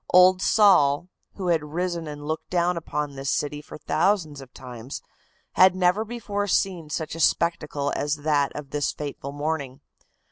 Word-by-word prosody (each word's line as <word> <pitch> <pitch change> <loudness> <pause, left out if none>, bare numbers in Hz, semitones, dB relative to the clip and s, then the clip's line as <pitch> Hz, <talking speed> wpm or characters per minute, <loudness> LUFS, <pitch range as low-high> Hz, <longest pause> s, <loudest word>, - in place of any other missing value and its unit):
Old 185 +1 +6
Sol, 180 -8 +4 0.3
who 185 -3 -3
had 165 -3 +2
risen 170 +2 -3
and 145 -1 -7
looked 155 +1 -4
down 180 0 +1
upon 150 -3 -3
this 135 0 -4
city 145 0 -1
for - - -11
thousands 160 -2 0
of 130 -2 -13
times, 125 0 -8 0.5
had 185 0 +6
never 185 +3 +2
before 210 -3 -3
seen 180 -5 0
such 155 +1 -3
a 165 - -6
spectacle 150 -4 +1
as 145 +1 0
that 145 -2 +1
of 145 -2 -7
this 145 -1 0
fateful 140 -2 -6
morning. 145 -2 -3
155 Hz, 165 wpm, -25 LUFS, 145-180 Hz, 0.5 s, Old